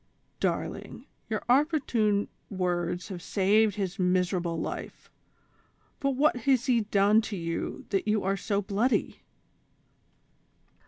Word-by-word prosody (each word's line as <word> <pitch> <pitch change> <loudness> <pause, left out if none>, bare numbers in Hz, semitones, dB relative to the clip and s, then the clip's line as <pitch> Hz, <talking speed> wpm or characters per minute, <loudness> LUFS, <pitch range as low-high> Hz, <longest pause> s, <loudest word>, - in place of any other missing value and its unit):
"Darling, - - -3 0.2
your - - -2
opportune 245 -7 +2 0.2
words 180 -2 -2
have 180 -3 -6
saved 205 +3 +2
his 195 -1 -3
miser 180 0 +2
able 170 -2 -2
life; - - -6 0.9
but 275 -1 0
what 295 +2 +3
has 250 0 +2
he 245 -4 +3
done 210 +1 +3
t9 210 -4 -5
you 165 0 -4
that 195 +1 0
you 210 -1 +1
are 195 +1 +1
so 200 +1 -1
bloody?" 215 +6 0
205 Hz, 120 wpm, -28 LUFS, 185-230 Hz, 0.9 s, what